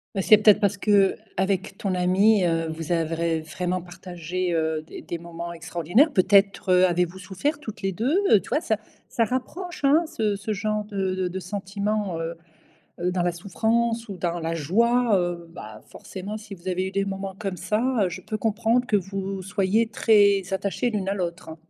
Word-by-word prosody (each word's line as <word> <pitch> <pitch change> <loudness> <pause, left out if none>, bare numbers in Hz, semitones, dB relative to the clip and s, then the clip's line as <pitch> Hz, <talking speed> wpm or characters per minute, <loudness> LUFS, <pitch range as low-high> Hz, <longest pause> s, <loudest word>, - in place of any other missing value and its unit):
Bah, 195 - +1
c'est 215 +3 +7
peut-être 210 -1 +6
parce 205 -2 +1
qu'avec 195 -2 +1
ton 190 -2 -1
amie, 185 +2 +4
heu, 165 -1 0
vous 160 +1 -5
avez, 165 -1 0
vraiment 180 +3 -3
partagé, 175 0 -4
heu, 160 -1 0
des - - -10
des 170 - -5
moments 170 0 -7
extraordinaires. 175 - +1
Peut-être, 195 0 +3
heu, 180 0 +6
avez-vous 180 +1 0
souffert 195 - -3
toutes 220 -8 -8
les 195 -1 -1
2. 250 - 0 0.2
Heu, 210 - +7
tu - - -13
vois? 300 - +1
Ça 220 -3 0 0.3
ça 230 - +1
rapproche, 330 - -4
hein, 305 +5 +4
ce 215 -8 -1
ce 215 +2 -3
genre 210 0 -2
de 195 -3 -2
de 185 -1 -1
de 185 +2 -4
sentiments, 200 -1 -3
heu 165 +1 -4 0.7
heu, 180 +1 0
dans 180 -1 0
la 175 - +2
souffrance 225 +5 -1
ou 195 - -6
dans 175 0 -2
la 165 +1 -2
joie, 230 - +2
heu, 175 -1 -2
bah, 110 0 -10
forcément, 200 +3 -7
si 210 -2 -9
vous 170 +2 -20
avez 185 0 0
eu - - -6
des 195 0 0
moments 195 0 -5
comme 195 -3 -3
ça, 210 +4 -1 0.2
heu, 185 - +2
je 175 - -7
peux 215 - -4
comprendre 225 +3 +1
que 210 - +4
vous 195 0 -3
soyez 195 +4 +1
très 205 -3 +4
attachées 200 +5 -1
l'une 200 -3 -2
à 195 - 0
l'autre. 170 -3 -5
195 Hz, 195 wpm, -24 LUFS, 175-215 Hz, 0.7 s, c'est